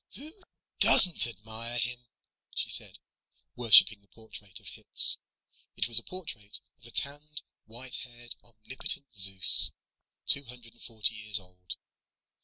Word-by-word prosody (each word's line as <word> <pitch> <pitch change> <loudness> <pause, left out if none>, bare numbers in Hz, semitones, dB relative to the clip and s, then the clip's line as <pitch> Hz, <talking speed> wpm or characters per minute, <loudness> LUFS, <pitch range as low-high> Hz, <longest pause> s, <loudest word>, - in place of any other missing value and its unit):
"Who 300 +4 -8 0.5
doesn't 180 -9 +2
admire 115 +1 -7
him?" 125 0 -7 0.5
she - - -6
said, - - -6 0.6
worshiping 110 -3 +4
the 100 - -27
portrait 105 -3 -14
of - - -26
Hitz. - - +3 0.6
It 100 - -3
was 115 -2 0
the - - +1
portrait 120 - -9 0.2
of 115 - -19
a - - -12
tanned, 145 +5 -6 0.2
white 120 +3 -10
haired, 120 -1 -12
omnipotent 120 +4 -9
Zeus, 95 -2 +7 0.5
two 140 0 +2
hundred 120 -1 -16
and 120 - -24
forty 115 -1 -3
years 105 -1 -1
old. 90 -2 -13
115 Hz, 135 wpm, -26 LUFS, 105-125 Hz, 0.6 s, Zeus